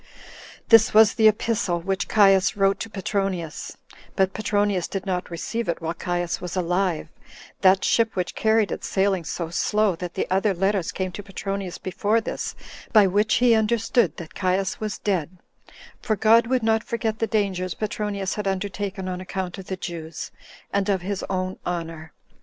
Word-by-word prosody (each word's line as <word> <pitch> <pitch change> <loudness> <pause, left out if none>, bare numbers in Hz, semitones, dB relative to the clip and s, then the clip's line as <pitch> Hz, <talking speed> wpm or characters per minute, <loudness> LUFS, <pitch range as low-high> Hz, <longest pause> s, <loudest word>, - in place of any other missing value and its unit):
9. - - -27 0.6
This 225 -2 +6
was 220 0 +7
the 220 -1 +5
epistle 210 -4 +1
which 190 +3 -2
Caius 195 -2 +4
wrote 195 0 +2
to 225 - -5
Petronius; 195 -5 -3 0.4
but 190 -1 +2
Petronius 205 -4 0
did 195 -1 -4
not 185 -2 -2
receive 215 +6 -3
it 170 - -1
while 165 0 -3
Caius 175 0 -2
was 180 0 -5
alive, 180 -2 0 0.5
that 190 0 +4
ship 225 -1 +2
which 180 -2 -2
carried 220 -1 +2
it - - -4
sailing 190 -2 +1
so 165 0 -4
slow, 210 +1 +1
that 180 0 -7
other 195 +1 +2
letters 195 -1 0
came 185 -1 -3
to 205 - -7
Petronius 195 -1 -5
before 205 +4 0
this, 225 - -4 0.4
by 215 -3 +7
which 205 +3 +2
he 245 -1 +5
understood 225 - +2
that 165 -2 -9
Caius 185 0 0
was 215 -1 -3
dead; 185 -3 -2 0.6
for 220 -3 0
God 225 +2 +5
would 255 -1 +1
not 220 0 +2
forget 220 -1 -2
the 225 - +1
dangers 190 -5 -1
Petronius 205 -2 -2
had 210 -1 -3
undertaken 195 0 -3
on 180 0 -4
account 185 0 -5
of 190 - -10
the 190 - -4
Jews, 165 -2 -6 0.4
and 200 0 +1
of 190 -3 +1
his 195 +1 -3
own 185 0 -2
honor. 165 -2 -5
195 Hz, 170 wpm, -24 LUFS, 180-215 Hz, 0.6 s, was